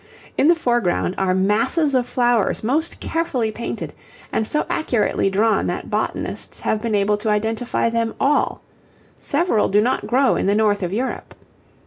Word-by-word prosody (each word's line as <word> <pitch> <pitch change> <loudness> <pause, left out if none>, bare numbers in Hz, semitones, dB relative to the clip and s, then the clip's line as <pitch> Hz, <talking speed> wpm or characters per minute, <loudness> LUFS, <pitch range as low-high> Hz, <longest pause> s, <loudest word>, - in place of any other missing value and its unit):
In 285 - +3
the 340 - +6
foreground 240 - 0
are 185 -1 +1
masses 230 - +1
of 250 -2 +1
flowers 240 -5 +1
most 300 +9 -1
carefully 260 -9 -1
painted, 235 +2 -5 0.4
and 220 - 0
so 300 - 0
accurately 240 -9 0
drawn 215 +3 +2
that - - -4
botanists - - -3
have 215 - -1
been 225 -2 -1
able 205 +1 +2
to 215 +1 -2
identify 220 +3 0
them 230 -1 -1
all; 290 +2 +1 0.5
several 290 -7 +1
do 205 - +3
not 240 +5 0
grow 260 +2 +3
in - - -1
the 200 - +3
north 210 -1 +2
of 180 -1 -2
Europe. 245 +6 -4
225 Hz, 160 wpm, -21 LUFS, 210-260 Hz, 0.5 s, the